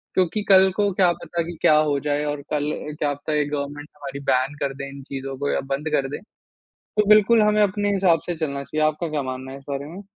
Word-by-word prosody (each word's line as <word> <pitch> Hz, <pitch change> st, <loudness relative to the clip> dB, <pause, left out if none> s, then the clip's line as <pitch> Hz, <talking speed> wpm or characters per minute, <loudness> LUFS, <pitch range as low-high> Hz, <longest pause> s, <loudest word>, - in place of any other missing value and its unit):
क्योंकि 185 Hz, +3 st, +1 dB
कल 190 Hz, 0 st, +7 dB
को 205 Hz, -1 st, +2 dB
क्या 180 Hz, -1 st, +4 dB
पता 170 Hz, 0 st, -4 dB
कि 170 Hz, 0 st, -7 dB
क्या 155 Hz, -, +5 dB
हो 150 Hz, -2 st, +2 dB
जाए 145 Hz, 0 st, 0 dB
और 145 Hz, -1 st, -3 dB
कल 150 Hz, 0 st, 0 dB, 0.3 s
क्या 145 Hz, -1 st, +1 dB
पता 145 Hz, +2 st, -5 dB
ये 150 Hz, -1 st, +2 dB
गवर्नमेंट 145 Hz, 0 st, -5 dB
हमारी 140 Hz, -1 st, -7 dB
बैन 130 Hz, +3 st, +2 dB
कर 140 Hz, -1 st, -1 dB
दे 140 Hz, 0 st, -6 dB
इन 140 Hz, 0 st, -10 dB
चीज़ों 135 Hz, 0 st, -6 dB
को 145 Hz, +1 st, -2 dB
या -, -, +1 dB
बंद 150 Hz, +3 st, -2 dB
कर 135 Hz, -2 st, +1 dB
दे। 145 Hz, -, -4 dB, 0.6 s
तो 210 Hz, -1 st, -2 dB
बिल्कुल 215 Hz, +2 st, +6 dB
हमें 210 Hz, 0 st, +3 dB
अपने 205 Hz, 0 st, +1 dB
हिसाब 185 Hz, -4 st, +3 dB
से 175 Hz, -, -2 dB
चलना 140 Hz, -3 st, -3 dB
चाहिए। 155 Hz, +2 st, 0 dB
आपका 155 Hz, +2 st, -1 dB
क्या 150 Hz, -2 st, -1 dB
मानना 130 Hz, 0 st, -6 dB
है 135 Hz, -, -8 dB
इस 135 Hz, -, -19 dB
बारे 140 Hz, 0 st, -3 dB
में? 175 Hz, +6 st, -9 dB
150 Hz, 240 wpm, -23 LUFS, 140-180 Hz, 0.6 s, कल